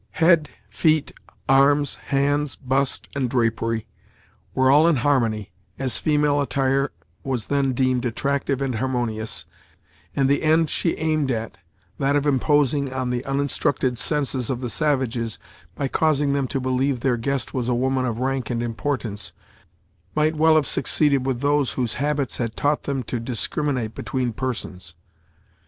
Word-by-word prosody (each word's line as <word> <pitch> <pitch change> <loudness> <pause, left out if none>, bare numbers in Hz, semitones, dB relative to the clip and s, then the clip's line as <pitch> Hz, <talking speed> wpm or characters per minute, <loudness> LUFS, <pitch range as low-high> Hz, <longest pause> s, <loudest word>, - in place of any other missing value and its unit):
Head, 165 -3 +4 0.2
feet, 155 -2 +1 0.3
arms, 140 +1 +4
hands, 145 0 0
bust, 135 0 -1
and 130 -3 0
drapery, 115 -2 0 0.7
were 130 0 +4
all 150 +4 +6
in 170 - +4
harmony, 120 -7 +1 0.3
as 130 -3 -1
female 150 -1 +2
attire 135 0 +1 0.3
was 125 -5 -2
then 135 -2 +2
deemed 130 -1 +1
attractive 140 +3 -1
and 135 -2 -1
harmonious, 120 -4 -2 0.7
and 135 -1 +2
the 140 +1 +2
end 160 0 +3
she 170 - 0
aimed 155 -3 0
at, 110 -5 -3 0.4
that 140 +1 +2
of 145 0 +1
imposing 140 0 +2
on 130 -1 -2
the 125 0 -2
uninstructed 135 -2 0
senses 135 -4 -1
of 130 -3 -1
the 120 -2 -3
savages, 130 -7 0 0.4
by 140 - -1
causing 145 -1 +1
them 140 -2 0
to 135 - -2
believe 130 0 0
their 130 -2 +2
guest 135 +3 -2
was 125 -2 -1
a 125 - +2
woman 130 +1 +1
of 120 -3 -2
rank 130 -1 -1
and 120 -1 -1
importance, 115 -3 -3 0.8
might 155 +1 +2
well 160 +1 +5
have 155 -2 +3
succeeded 140 -3 +2
with 130 -2 -1
those 145 -1 +2
whose 125 -3 -1
habits 145 -2 0
had 115 -2 -3
taught 145 +1 0
them 135 -2 -2
to 120 +1 -3
discriminate 125 0 -2
between 125 -3 -2
persons. 95 -9 -5
135 Hz, 150 wpm, -23 LUFS, 125-145 Hz, 0.8 s, all